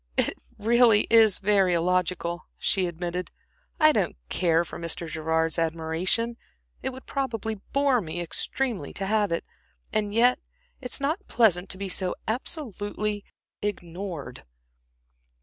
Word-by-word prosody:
"It - - +3 0.2
really 230 0 +5
is 220 -4 +6
very 195 -3 +3
illogical," 175 0 0
she 190 -2 +1
admitted, 175 +1 -4 0.5
"I 310 -1 +7
don't 195 - 0
care 170 -1 +2
for - - -8
Mr. 170 0 -1
Gerard's 160 +1 0
admiration, 165 +8 -1 0.4
it - - -1
would 260 0 -10
probably 225 -6 -3
bore 275 -3 +3
me 170 -1 -5
extremely 225 +6 -2
to 195 - -3
have 210 -1 +1
it; 165 - -1 0.5
and 210 -1 +1
yet 245 +4 +4 0.4
it's 250 +2 0
not 315 +9 -1
pleasant 190 -6 +3
to - - -3
be 200 0 -3
so 185 -1 -1
absolutely 210 - -3 0.4
ignored." 175 - -5
195 Hz, 130 wpm, -26 LUFS, 170-230 Hz, 0.5 s, I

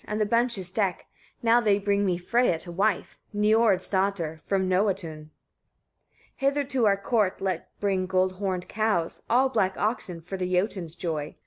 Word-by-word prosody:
and 210 +1 -2
the 215 - +2
benches 230 -4 +1
deck, 195 -3 -1 0.4
now 235 +1 +5
they 210 -3 +3
bring 200 0 +1
me 185 -3 +1
Freyia 180 -1 +1
to 175 - -8
wife, 200 +3 -1 0.2
Niord's 210 -1 +3
daughter, 185 -5 -1
from 190 -1 +1
Noatun. 180 -5 -1
24. - - -37 1.1
"Hither 280 +1 +1
to 255 -4 +1
our 200 -1 +3
court 200 -1 0
let 185 -3 -3
bring 190 -2 0
gold 185 0 +2
horned 185 -2 -2
cows, 215 -7 -1
all 255 +3 +4
black 190 -7 +1
oxen, 210 -5 -2
for 185 +4 -6
the 180 -1 -3
Jotuns' 180 -3 0
joy. 155 -3 -4
195 Hz, 165 wpm, -26 LUFS, 180-215 Hz, 1.1 s, now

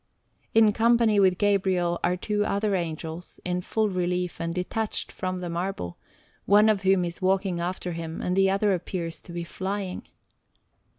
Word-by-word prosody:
In 220 -1 +6
company 230 -2 +4
with 185 -2 +4
Gabriel 185 -4 +1
are 180 - +1
two 205 +2 0
other 205 0 0
Angels, 165 0 -5
in 180 0 -1
full 220 +4 0
relief 180 -2 -2
and 165 0 -1
detached 185 +5 -2
from 185 -1 -3
the 180 - -4
marble, 170 - -4 0.5
one 210 +2 +6
of 210 -3 +2
whom 190 -2 +3
is 170 +2 -6
walking 190 -1 +1
after 180 +1 -3
him 165 -1 -5
and 180 - -1
the 195 0 +4
other 200 +1 +2
appears 170 -3 -4
to - - -12
be 170 0 -4
flying. 190 +2 -4
185 Hz, 165 wpm, -26 LUFS, 175-200 Hz, 0.5 s, In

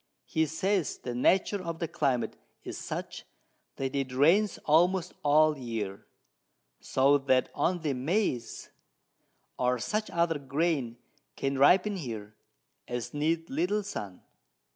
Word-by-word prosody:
He 160 0 0
says 185 +2 0
the 125 - -5
Nature 190 +10 +2
of 170 -1 -4
the 165 - -2
Climate 135 -5 0 0.3
is - - -6
such, - - -6 0.5
that 135 +1 -3
it 135 -2 -1
rains 170 +11 +3
almost 175 +4 +3
all 155 +1 +5
the 140 - -11
Year, 110 -5 -5 0.7
so 140 +2 +3
that 130 -2 +2
only 160 -1 0
Maiz 135 - -1 0.9
or 125 0 +2
such 215 - -2
other 170 -2 +1
Grain 140 -3 -1 0.4
can 135 0 -2
ripen 190 +8 +5
here, 110 - -6 0.5
as 120 -1 -4
need 160 +3 0
little 180 +9 0
Sun. 100 - -7
150 Hz, 125 wpm, -29 LUFS, 130-170 Hz, 0.9 s, all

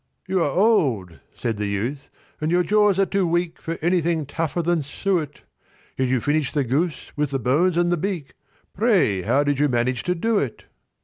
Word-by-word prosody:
"You 190 -1 +1
are 150 - +2
old," 135 - +1 0.2
said 115 -3 -2
the 105 0 -2
youth, 115 +8 -3 0.3
"and 155 - 0
your 175 +1 +3
jaws 210 +1 +3
are 195 - +4
too 195 -2 0
weak 175 0 -1
For 165 0 -4
anything 170 -3 +1
tougher 165 +4 -2
than 170 -1 +1
suet; 155 +1 -2 0.5
Yet 130 - 0
you 130 0 +1
finished 145 +4 -1
the 145 - +2
goose, 150 +7 -2
with 150 -1 0
the 135 - -1
bones 150 +9 +2
and 175 0 +2
the 175 - +2
beak— 175 -5 -4 0.4
Pray, 180 - +2
how 140 +10 +2
did 145 -1 0
you 145 0 +3
manage 120 +1 0
to 180 0 +1
do 220 +4 +1
it?" 125 -6 -4
155 Hz, 195 wpm, -23 LUFS, 135-180 Hz, 0.5 s, are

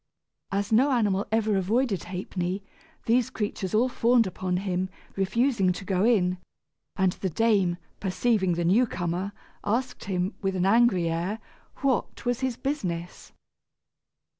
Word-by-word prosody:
As 200 +2 -1
no 250 +6 +5
animal 205 -5 +1
ever 220 -1 +2
avoided 205 0 0
Ha'penny, 180 +1 -3 0.4
these 235 +1 +3
creatures 205 -2 -3
all 235 +4 +4
fawned 240 -1 +3
upon 185 -1 -2
him, 185 0 -1 0.3
refusing 195 0 +2
to 190 - -8
go 185 0 +1
in; 185 -6 +3 0.6
and 190 -2 +2
the 190 - -3
dame, 195 -2 +2 0.2
perceiving 195 -1 +1
the 170 0 -1
new 225 +8 +4
comer, 180 +1 -2 0.3
asked 245 +5 -1
him, 185 +1 -1
with 195 -2 -1
an 185 0 +1
angry 195 -4 +4
air, 170 +6 -1 0.5
what 270 -1 0
was 245 -1 0
his 260 -3 -1
business. 180 - -4
195 Hz, 140 wpm, -27 LUFS, 180-230 Hz, 0.6 s, no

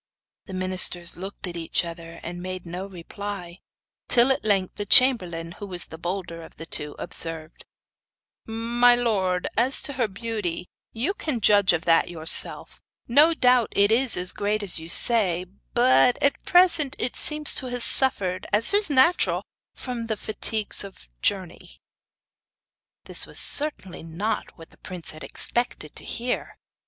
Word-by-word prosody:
The 190 - -8
ministers 185 -2 +1
looked 195 +3 -8
at 175 -2 -7
each 170 +1 -2
other, 165 0 -9
and 175 +1 -7
made 185 0 -6
no 180 +3 -7
reply; 185 0 -8 0.5
till 245 +2 +4
at 265 - -1
length 195 -3 -1
the 205 - -4
chamberlain, 180 -11 +3
who 205 +4 -10
was 180 -2 -6
the 160 - -12
bolder 175 -1 -5
of 160 - -14
the 165 - -8
two, 150 -2 -6
observed: 165 -1 -8 0.8
'My 235 +2 +2
lord, 195 -7 -1
as 250 +5 +2
to 285 - -6
her 250 -3 -1
beauty, 200 -4 -5 0.3
you 255 - -3
can 300 - -3
judge 205 -2 +4
of 175 0 -2
that 165 -1 +4
for - - -11
yourself. 160 -1 +2 0.3
No 300 +7 +4
doubt 250 -5 +2
it 200 +1 +3
is 245 +1 +2
as 180 0 -1
great 210 +1 -3
as 185 -4 +5
you 160 +1 -10
say; 185 -4 +3 0.3
but 250 0 +4
at 280 - +1
present 335 -6 +3
it 240 - -3
seems 300 -1 +6
to 260 - -2
have 245 -1 -3
suffered, 195 -10 +1
as 215 - +1
is 410 -3 +2
natural, 290 +6 +2 0.3
from 240 -3 -6
the 220 -1 -3
fatigues 215 0 -1
of 195 -1 -11
the 70 - -19
journey.' 190 -4 -4 1.2
This - - +3
was - - -9
certainly 285 - -2
not 165 +7 -5
what 165 -1 -15
the - - -22
prince 180 -3 -4
had 155 -1 -12
expected 155 - -1
to - - -6
hear. 245 +1 -5
200 Hz, 165 wpm, -23 LUFS, 175-245 Hz, 1.2 s, seems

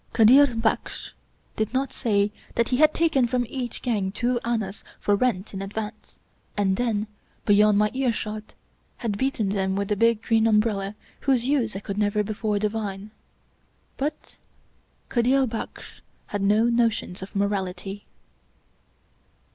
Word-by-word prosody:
Kadir 250 +5 +7
Baksh 225 0 -1 0.4
did 220 +3 -2
not 265 0 0
say 205 -4 +1 0.2
that 235 - +1
he 250 - +1
had 305 +2 +6
taken 315 -7 +2
from 245 0 0
each 245 -1 -5
gang 205 -6 0
two 240 +4 0
annas 220 -4 -2 0.2
for 205 - +2
rent 210 -3 0
in 195 - -4
advance, 210 +2 -6 0.4
and 195 -2 +2
then, 215 -2 0 0.4
beyond 210 0 +5
my 210 0 +3
earshot, 215 -5 -2 0.4
had 225 -4 -2
beaten 260 -6 0
them 190 -1 0
with 200 0 -2
the 210 - +2
big 230 +1 +2
green 225 -1 +3
umbrella 210 -2 +1 0.2
whose 260 -4 +1
use 255 -7 +1
I 195 - -4
could 200 0 -4
never 210 0 +2
before 210 0 -1
divine. 210 -1 -3 0.9
But 300 +3 -4 0.7
Kadir 260 +3 +3
Baksh 225 -2 -7 0.2
has 205 - -4
no 210 +3 +4
notions 235 -6 +1
of 190 - -9
morality. 200 0 -2
215 Hz, 140 wpm, -25 LUFS, 205-240 Hz, 0.9 s, Kadir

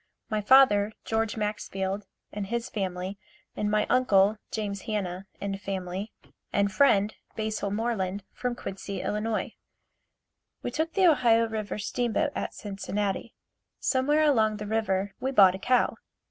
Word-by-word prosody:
My 215 0 +1
father, 215 -3 +6
George 225 0 0
Maxfield 205 -2 -3 0.2
and 205 -1 -4
his 235 +3 -2
family 190 -1 -3 0.4
and 210 - -1
my 210 0 +2
uncle, 215 -5 +4
James 200 -3 -3
Hanna 190 -3 -3
and 195 0 -4
family 190 +1 -4 0.4
and 200 0 +2
friend, 210 -3 +4 0.2
Basil 215 -2 -2
Moreland, 205 -3 -1
from 250 -1 -2
Quincy, 195 -3 -5
Ill. 215 +1 -1 1.3
We 245 - -2
took 315 +5 -1
the 385 -2 +4
Ohio 240 -8 +5
River 215 -2 -4
steam 230 +2 -2
boat 305 -2 +1
at - - -4
Cincinnati. 200 0 -3 0.4
Somewhere 290 +4 +2
along 220 -8 +3
the 210 - -5
river 205 -2 0
we 265 - -1
bought 195 -8 +7
a 190 - -6
cow. 250 +5 +2
210 Hz, 140 wpm, -28 LUFS, 195-230 Hz, 1.3 s, bought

